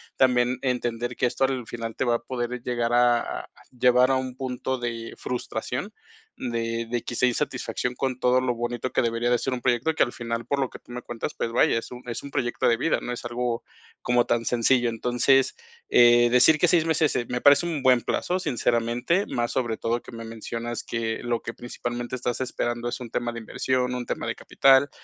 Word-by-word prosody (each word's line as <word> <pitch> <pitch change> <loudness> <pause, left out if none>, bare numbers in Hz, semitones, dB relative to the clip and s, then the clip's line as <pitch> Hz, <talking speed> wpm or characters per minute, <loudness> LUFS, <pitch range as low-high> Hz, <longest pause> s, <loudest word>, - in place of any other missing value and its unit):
También, 125 -1 +3
entender 120 -1 -1
que 125 - +2
esto 125 +2 -2
al 130 -3 0
final 115 -2 -5
te 130 - -1
va 120 - +3
a 120 - -4
poder 125 -1 -3
llegar 120 -1 -1
a 120 -1 +2
a - - -16 0.2
llevar 125 0 +4
a - - +3
un 130 -1 -3
punto 130 0 -3
de 115 -1 -4
frustración, 125 - -4 0.4
de 115 -1 -2
de 120 0 -1
quizá 125 +1 +1
insatisfacción 125 0 -2
con 130 0 -2
todo 125 0 +3
lo 125 -2 0
bonito 120 +1 -3
que - - +1
debería 115 +1 0
de 120 - +4
ser 130 - -2
un 125 - -4
proyecto, 125 +6 +1
que - - -2
al 120 - -3
final, 115 0 -4
por 140 - 0
lo 135 -2 0
que - - -10
tú - - -17
me 125 - -5
cuentas, 120 -1 -5
pues, 115 - -2
vaya, 115 - +3
es 115 - -5
un 125 - -8
es 115 +2 -5
un 140 - -8
proyecto 120 -1 0
de 115 - +3
vida, 165 +7 +1
no 120 - -4
es 120 - -7
algo 120 0 -2 0.4
como 120 0 +2
tan 115 0 0
sencillo. 120 0 +3
Entonces, 125 +3 +2 0.3
eh, 120 0 +6
decir 125 +5 +6
que 175 - +3
6 165 -2 +3
meses, 160 -3 +2
eh, 120 - 0
me 125 0 -2
parece 145 +4 +6
un 155 -5 -3
buen 130 -2 +5
plazo, 180 +9 -1
sinceramente, 125 - 0
más 120 -1 -1
sobre 120 -4 -1
todo 120 +1 -1
que - - -12
me 115 0 -8
mencionas 115 +1 -5
que 115 -1 -2
lo 120 -1 -1
que 115 - -6
principalmente 120 0 -5
estás 125 -1 -2
esperando 120 -1 -2
es - - -5
un 120 - -7
tema 120 +1 -2
de 115 - -5
inversión, 125 +2 -1
un 125 -1 -3
tema - - -3
de - - -2
capital. 135 +1 +4
120 Hz, 220 wpm, -25 LUFS, 120-130 Hz, 0.4 s, eh